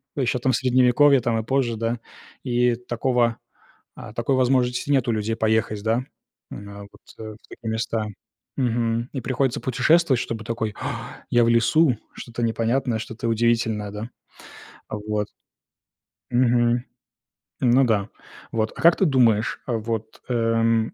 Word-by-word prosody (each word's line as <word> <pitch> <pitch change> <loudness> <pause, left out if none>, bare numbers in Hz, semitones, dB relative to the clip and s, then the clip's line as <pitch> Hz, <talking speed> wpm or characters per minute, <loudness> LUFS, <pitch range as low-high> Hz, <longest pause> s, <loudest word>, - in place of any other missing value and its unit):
еще, 130 -3 0
там, 130 +2 +1
в 120 - +1
Средневековье, 130 +2 +4
там, 115 -2 0
и 110 - -3
позже, 125 -1 0
да. 115 +1 -2 0.4
И 125 -1 +2
такого, 120 0 0 0.6
а, - - -10
такой 120 +3 0
возможности 125 0 +1
нет 135 -3 +2
у - - +2
людей 110 +1 -1
поехать, 110 -2 0
да, 115 +3 +1 0.5
м, 100 0 -9
вот - - -20 0.2
в 110 -1 -8
такие 115 - -7
места. 110 -1 -2 0.5
Мгм. 115 -1 0
И 130 - -3
приходится 130 +1 0
путешествовать, 130 +2 +3
чтобы 110 -1 -4
такой: 110 -2 -3
"А, - - -6
я 120 -1 +4
в - - +2
лесу, 120 +3 +3 0.2
что-то 120 0 -7
непонятное, 115 +1 0
что-то 115 +1 -5
удивительное", 115 -2 +1
да? 105 +3 -6 0.8
Вот. 105 0 -3 1.0
Мгм. 120 -1 +2 0.8
Ну 130 +1 +4
да. 105 -3 0 0.4
Вот. 110 -1 -1
А - - -8
как 170 +1 +6
ты 190 - +3
думаешь, 120 -6 +2
вот, 110 -2 -3
эм, 115 -1 +1
115 Hz, 140 wpm, -23 LUFS, 110-125 Hz, 1.0 s, как